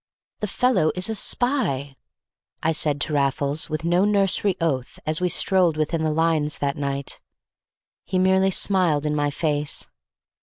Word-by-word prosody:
"The 210 - -2
fellow 220 -7 +2
is 185 +3 -2
a - - -1
spy!" 200 - -1 0.7
I 160 - +2
said 150 -2 +1
to 155 - -1
Raffles, 140 +2 0
with 155 +1 -3
no 175 +2 +3
nursery 200 -1 +2
oath, 135 -7 -2
as 155 +2 0
we 180 - +1
strolled 175 -2 +2
within 155 +1 -1
the 160 - +1
lines 155 -1 +1
that 140 0 -1
night. 140 -2 -3 0.9
He 185 - -1
merely 190 +1 +3
smiled 180 -6 +1
in 150 - 0
my 145 -1 +1
face. 145 0 -2
160 Hz, 155 wpm, -23 LUFS, 145-185 Hz, 0.9 s, no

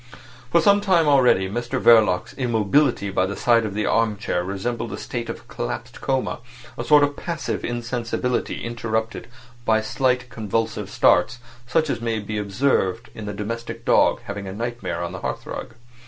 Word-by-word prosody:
For 170 - +5
sometime 195 -4 +4
already 125 -9 +4
Mr 120 +4 -3
Verloc's 105 -6 +4
immobility 120 -2 +1
by 95 -1 +1
the 100 - -4
side 115 -2 +3
of 100 - -7
the 105 - 0
arm 115 -2 +1
chair 90 -4 -1
resembled 100 +6 -3
a - - -4
state - - -5
of - - -7
collapsed - - -5
coma—a 125 -2 -4
sort 150 -2 +6
of 145 0 +1
passive 165 0 -4
insensibility 120 +1 -2
interrupted 115 -1 -3 0.4
by 110 -1 +3
slight 125 +2 0
convulsive 110 -1 -2
starts, 105 +5 +3 0.3
such 155 +5 +2
as 120 -5 -2
may 115 -1 -1
be 105 0 -4
observed 105 0 0
in 110 -1 -7
the - - -2
domestic 115 +3 -5
dog - - +4
having 100 -3 -6
a 95 - -5
nightmare 105 -6 -4
on 85 - -4
the 95 - -6
hearthrug. 120 - -5
115 Hz, 160 wpm, -23 LUFS, 105-125 Hz, 0.4 s, sort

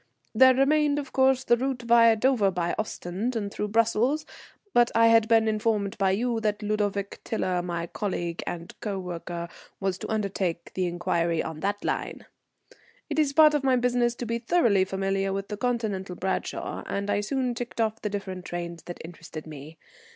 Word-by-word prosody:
There 260 +3 +7
remained, 290 +2 +3
of 280 -2 -5
course, 265 -1 +3
the 240 - +4
route 255 0 -2
via 230 -1 +6
Dover 220 -3 +3
by 175 -2 -1
Ostend 215 +3 -3
and 205 -3 -3
through 210 - -2
Brussels; 230 +7 +2 0.5
but 240 0 +5
I 230 0 +6
had 225 -1 +5
been 225 -1 +4
informed 215 -2 0
by 195 -1 +3
you 230 +4 0
that 210 -1 -1
Ludovic 205 -1 -2
Tiler, 185 -5 -1
my 170 -1 -3
colleague 175 -3 -3
and 170 0 -5
coworker, 175 -4 -4 0.3
was 190 -1 -1
to - - -6
undertake 195 -5 -2
the 185 -1 0
inquiry 170 -1 0
on 160 -1 -6
that 205 +4 -2
line. - - -3 0.9
It 295 - 0
is 295 -3 +3
part 305 +1 +6
of 295 -2 0
my 265 -1 +4
business 245 -1 +1
to 240 - -5
be 230 +1 -2
thoroughly 230 - +3
familiar 195 0 -1
with 195 0 -4
the 210 - -4
Continental 210 -6 -2
Bradshaw, 190 +2 -3
and 200 0 -2
I 205 - +1
soon 255 +3 -1
ticked 240 0 -6
off 220 0 0
the 210 - -2
different 190 -3 -5
trains 170 -2 -5
that 175 - -7
interested 165 -2 -9
me. 155 +1 -10
210 Hz, 180 wpm, -26 LUFS, 185-240 Hz, 0.9 s, There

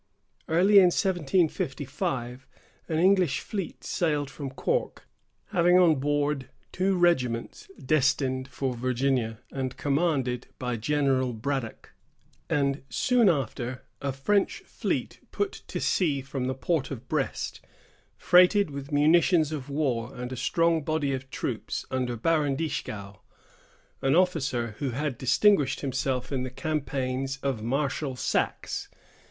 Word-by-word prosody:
Early 185 +6 +5
in 190 - +7
1755, 145 -8 -1 0.4
an 160 - 0
English 185 -2 +3
fleet 195 -6 -5
sailed 150 -5 -1
from 140 -1 -6
Cork, 475 - -2 0.4
having 180 -2 +4
on 165 -6 +5
board 145 -1 0 0.2
two 190 +1 +1
regiments 130 -10 0
destined 130 -2 +1
for 135 -1 -3
Virginia, 125 -2 0
and 130 -2 -4
commanded 140 -5 0
by 125 -1 -2
General 130 +1 +1
Braddock; 115 +1 -4 0.6
and 140 -1 +1
soon 240 - +3
after, 130 -4 -2 0.2
a 140 - -1
French 195 +10 0
fleet - - -3
put 405 -1 -1 0.2
to - - -4
sea 150 -7 +1
from 135 -1 -4
the 130 +1 -1
port 135 0 -1
of 130 -5 -7
Brest, - - -2 0.6
freighted 180 0 +5
with 140 0 -7
munitions 155 +2 +4
of 145 -3 -5
war 135 -5 -1
and 125 0 -5
a - - -4
strong 165 +5 +2
body 150 -2 0
of 130 0 -5
troops - - -4
under 125 -2 -1
Baron 150 +1 +1
Dieskau, 105 -10 -4 0.8
an 135 +2 +2
officer 135 -10 +1
who 140 -2 -1
had 130 0 -3
distinguished 135 - +3
himself 130 -1 -2
in 135 -2 -1
the 130 - -3
campaigns 135 -2 -2
of 135 -5 -1
Marshal 135 +3 -1
Saxe. - - -2
140 Hz, 125 wpm, -27 LUFS, 130-160 Hz, 0.8 s, in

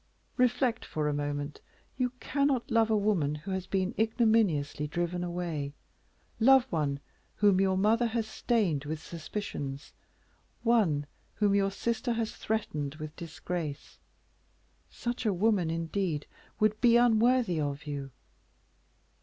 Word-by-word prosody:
Reflect 250 -1 +2
for 155 -1 -2
a 150 - +1
moment; 145 0 -3 0.3
you 255 -1 0
cannot 280 -4 0
love 225 -1 +4
a 220 - +3
woman 190 -9 +1
who 155 +6 -7
has 190 -1 -3
been 190 -1 0
ignominiously 220 - +2
driven 175 +3 -2
away 170 -5 -3 0.6
love 265 +3 +7
one 145 -4 0 0.4
whom 200 -2 +4
your 190 -1 +2
mother 225 +5 +3
has 225 -1 -1
stained 215 - 0
with 155 +1 -3
suspicions; 155 -4 -6 0.7
one 200 -12 +3 0.3
whom 205 -2 +2
your 200 -1 +3
sister 235 +5 -1
has 225 -1 -2
threatened 155 -10 -2
with 155 -1 -7
disgrace; 165 -2 -5 0.9
such 240 0 -4
a 215 -4 +2
woman, 195 -3 +2
indeed, 165 -1 -2 0.3
would 215 -1 +2
be 235 -1 +6
unworthy 240 -5 +3
of 145 +1 -3
you." 140 -2 -4
190 Hz, 130 wpm, -30 LUFS, 155-225 Hz, 0.9 s, love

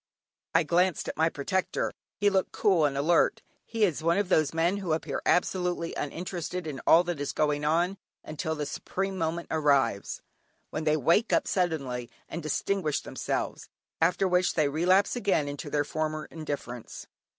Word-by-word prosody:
I 165 - +6
glanced 175 +2 +1
at - - -4
my 160 +1 +3
protector; 185 +6 -1 0.2
he 205 0 +3
looked 190 -1 +1
cool 185 -8 +3
and 140 -1 0
alert. 165 +4 +2 0.2
He 225 -2 +2
was 165 -6 -2
one 170 +2 +2
of 200 -3 0
those 155 -5 +3
men 170 +4 +1
who 185 -5 -1
appear 160 - -2
absolutely 180 -1 +1
uninterested 175 +2 -4
in 145 -4 -5
all 170 - +7
that 175 -4 -3
is 145 - -2
going 150 -1 +1
on 175 +5 +1 0.2
until 155 +1 -3
the 150 -1 -3
supreme 195 +6 -3
moment 170 -1 -2
arrives, 140 -9 +1 0.5
when 155 - -3
they 155 0 +3
wake 170 - +3
up - - +2
suddenly 140 -10 -1 0.2
and 170 - -5
distinguish 155 +1 -1
themselves, - - -3 0.3
after 180 +4 +3
which 180 0 +2
they 155 -3 +3
relapse 180 - +3
again 195 -10 +1
into 145 +1 -5
their 145 0 +1
former 155 0 -2
indifference. 145 -7 -6
165 Hz, 165 wpm, -28 LUFS, 150-180 Hz, 0.5 s, all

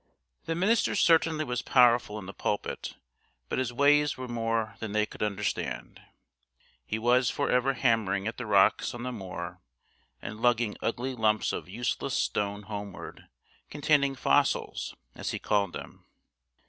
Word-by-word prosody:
The 165 - -1
minister 205 +6 +2
certainly 165 -4 +3
was 125 -3 -2
powerful 120 -4 +4
in 105 - -7
the 95 - -8
pulpit, 105 - -3 0.5
but - - -1
his 130 -2 -1
ways 145 +2 +3
were 130 0 -5
more 115 -2 -1
than 110 -2 -5
they 105 0 +2
could - - -13
understand. 105 -1 -3 0.8
He 110 - -3
was 120 +2 +3
for - - -1
ever 125 +2 +3
hammering 110 -6 +1
at 115 - -4
the 125 - -5
rocks 100 +3 +3
on 120 - -6
the 125 - -3
moor 90 -5 -7 0.6
and 110 +2 -7
lugging 120 -3 +2
ugly 125 +3 -2
lumps 110 -3 +1
of - - -5
useless 120 +6 -2
stone 100 0 -1
homeward, 100 -2 -8 0.4
containing 145 -1 +2
"fossils" - - +1 0.2
as - - -5
he - - -2
called 100 -2 0
them. - - -9
115 Hz, 150 wpm, -28 LUFS, 105-130 Hz, 0.8 s, powerful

